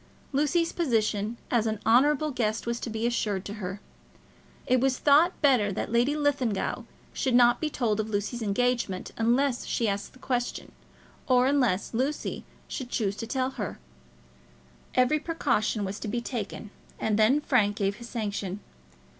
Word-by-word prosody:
Lucy's 300 +4 +1
position 225 - 0
as 230 -2 +2
an 215 -1 -2
honourable 290 +6 +4
guest 220 -4 -1
was 235 0 -2
to - - -5
be 220 +1 -2
assured 210 -5 -1
to 205 - -5
her. 190 +2 -4 0.9
It 255 0 +3
was 265 0 +1
thought 305 +5 +4
better 245 -8 +4
that 195 - -3
Lady 240 +5 +2
Linlithgow 280 -8 0 0.3
should 260 -4 0
not 240 -1 +5
be 310 - 0
told 225 -7 0
of 215 0 -2
Lucy's 210 +3 -2
engagement 220 -2 0
unless 245 +3 +1
she 230 - 0
asked 200 +5 -4
questions; 245 -1 -3 0.6
or 250 -1 +4
unless 250 -9 +1
Lucy 265 +6 -2 0.2
should 260 -4 -5
choose 205 -5 -1
to 230 - -5
tell 260 +1 -1
her. 210 -8 -5 1.2
Every 255 +4 +3
precaution 245 -10 0
was 195 +2 -5
to - - -5
be 235 +3 -1
taken, 230 -3 -5 0.3
and 215 -1 0
then 235 +7 +5
Frank 220 -8 +2
gave 200 -1 -1
his 235 0 -10
sanction. 205 -4 -3
235 Hz, 155 wpm, -27 LUFS, 210-265 Hz, 1.2 s, not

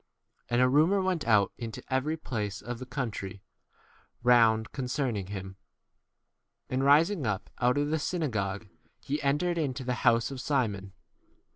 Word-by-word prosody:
37 - - -6
And 120 - +4
a - - +5
rumour 155 +9 +4
went 185 -8 -1
out 105 -4 +4
into 115 -2 -6
every 150 +5 0
place 105 -8 -4
of 120 0 -5
the 130 - -8
country 105 -8 -5 0.8
round 115 -2 +4
con 130 -3 -4
38 125 -7 -1
cerning - - -14
him. 95 -1 -7 1.1
And 130 +1 0
rising 150 - +4
up 100 -1 -3
out 125 +2 +2
of 145 +1 0
the 160 - +1
synagogue, 110 - -2 0.3
he 145 +2 -3
entered 160 +5 +1
into 135 -3 -2
the 125 0 -1
house 115 +2 +3
of 130 -2 -5
Simon. 105 -9 -1
125 Hz, 160 wpm, -29 LUFS, 110-145 Hz, 1.1 s, a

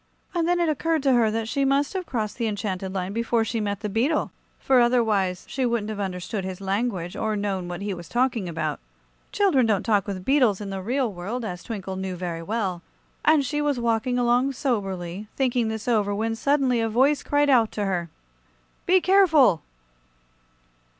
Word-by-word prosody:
And 340 -2 0
then 350 0 +2
it 340 - +2
occurred 315 0 0
to 270 -2 +4
her 235 -3 +4
that 220 +1 -2
she 275 +4 0
must 275 +3 +1
have 370 -2 -4
crossed 220 -2 -3
the 230 - 0
enchanted 195 -3 -3
line 190 0 -3
before 230 0 +1
she 225 +1 -2
met 200 -2 -2
the 210 - -2
beetle, 245 +10 0 0.3
for 265 -2 +3
otherwise 220 -7 +2
she 265 - -2
wouldn't 235 -3 0
have 210 - -6
understood 190 +1 -3
his 185 0 -5
language, 195 -3 -2
or 220 -1 -1
known 195 -3 -2
what 175 +2 -5
he 205 -1 -2
was 175 -2 -9
talking 240 -6 0
about. 155 -2 -3 0.5
Children 320 - +3
don't 210 -4 +1
talk 210 -3 +2
with 185 -2 -5
beetles 255 -8 +3
in 200 -2 -6
the 195 -1 -4
real 245 +2 -1
world, 210 +7 -4
as 180 -4 -5
Twinkle 190 -4 -5
knew 190 -1 -4
very 175 -2 -4
well, 190 -2 -2 0.4
and 305 -3 +4
she 295 +3 -1
was 290 -3 0
walking 235 +1 0
along 245 +2 +2
soberly, 195 -7 -3
thinking 250 -3 +1
this 220 0 -4
over, 210 -4 +1
when 225 +2 -1
suddenly 265 -1 +2
a 225 - 0
voice 270 +6 +3
cried 290 0 +1
out 230 -4 +4
to 210 - -2
her: 175 -3 -2 0.8
"Be 370 +1 +5
careful!" 320 - +5
225 Hz, 190 wpm, -24 LUFS, 195-260 Hz, 0.8 s, Be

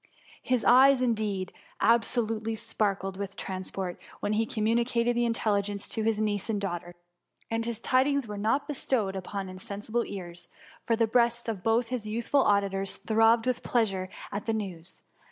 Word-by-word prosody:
His 250 -3 0
eyes, 265 +2 +7
indeed, 215 -6 -1 0.3
absolutely 225 -1 +1
sparkled 195 -3 -1
with 200 0 -5
transport, 185 -1 -4 0.2
when 205 - -1
he 220 +1 +1
communicated 235 +2 +1
the 240 0 +2
intelligence 205 -3 0
to 225 - -2
his 220 0 +1
niece 210 -1 -1
and 210 -2 0
daughter; 175 -3 -4 0.6
and 225 0 0
his 230 -1 -3
tidings 265 +1 +2
were 210 - -5
not 270 +8 +1
bestowed 245 -9 0
upon 195 +1 -4
insensible 205 +5 -3
ears, 175 -3 -6 0.4
for 230 - +3
the 230 0 +3
breasts 235 +1 +2
of 215 -5 -3
both 225 +3 +2
his 245 -4 -3
youthful 235 +6 +1
auditors 195 -3 +1
throbbed 225 +2 +3
with 255 -1 0
pleasure 195 -6 0 0.2
at 205 +2 -4
the 225 - +2
news. 190 -5 -6
220 Hz, 155 wpm, -28 LUFS, 195-235 Hz, 0.6 s, eyes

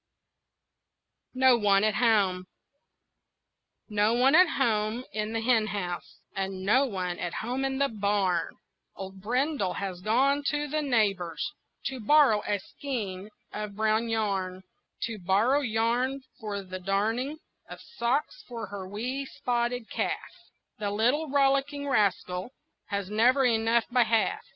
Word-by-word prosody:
NO 260 -1 +5
ONE 200 -1 +4
AT 215 0 +3
HOME 200 -6 +2 1.4
No 210 +1 +2
one 260 +3 +4
at 360 +2 +7
home 225 -2 +1
in 215 0 -2
the 225 - -1
hen 225 -2 +3
house, 180 -4 -5 0.2
And 190 -1 -3
no 260 +7 +4
one 180 -5 -3
at 175 - -3
home 250 +4 -2
in 270 0 -1
the 280 0 +2
barn, 200 -6 0 0.4
Old 190 0 -8
Brindle 250 - 0
has 190 -3 -4
gone 265 +8 +2
to 295 -1 0
the 305 +2 -1
neighbor's 205 - 0 0.3
To 265 -1 -3
borrow 245 -2 +5
a 205 - +1
skein 205 -3 -5 0.2
of 210 -1 -5
brown 220 +2 +1
yarn, 195 -4 -1 0.4
To 225 -2 -3
borrow 205 +10 +3
yarn 245 +3 0 0.2
for 205 -3 -4
the 185 0 -7
darning 220 +10 -1 0.3
Of - - -8 0.2
socks 280 - 0
for 235 -3 -5
her 195 -2 -6
wee 250 +8 -4
spotted 240 -2 -2
calf - - -2 0.5
The 205 -1 -1
little 245 +10 +1
rollicking 280 +1 +1
rascal 195 -5 0 0.4
Has 200 -1 -3
never 250 +5 +4
enough 230 -1 +2
by 250 0 +4
half. 225 -1 +1
220 Hz, 135 wpm, -28 LUFS, 200-255 Hz, 1.4 s, at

